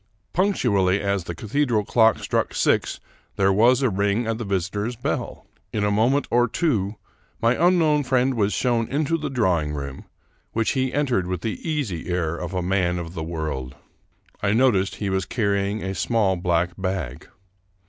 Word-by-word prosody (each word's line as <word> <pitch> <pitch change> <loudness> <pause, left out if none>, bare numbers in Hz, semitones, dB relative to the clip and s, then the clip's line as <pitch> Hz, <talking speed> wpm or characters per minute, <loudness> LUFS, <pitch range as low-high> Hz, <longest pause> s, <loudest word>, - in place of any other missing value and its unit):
Punctually 105 - +2
as 100 -3 -1
the 85 - -5
cathedral 115 - 0
clock 110 0 +4
struck - - -1
six - - +1 0.4
there 95 0 +3
was 120 +6 +4
a 130 - +3
ring 100 +4 +1
at 115 0 -2
the - - -3
visitor's 100 +4 -2
bell. 120 - -4 0.3
In 105 - -1
a 105 - +2
moment 120 +7 +2
or 120 +1 +4
two 110 - 0 0.4
my 115 +1 +3
un 180 +1 +5
known 150 -3 +3
friend 130 0 +2
was 105 -4 +1
shown 120 -2 +1
into 150 +3 0
the 155 - -3
drawing 90 - +1
room, 70 -2 -6 0.5
which 115 -1 +1
he 130 -1 0
entered 130 -11 0
with 90 -1 -3
the 110 +1 -4
easy 120 - -2
air 85 -2 -1
of 90 +2 -5
a 90 - -1
man 90 -1 +1
of 85 -1 -6
the 80 - -5
world. 80 -6 -4 0.7
I 100 0 +1
noticed 110 -6 +2
he 100 -2 -3
was 95 0 0
carrying 100 -2 0
a 95 0 -2
small 105 -2 +1
black 85 -1 0
bag. 90 -9 -3
100 Hz, 175 wpm, -23 LUFS, 90-120 Hz, 0.7 s, un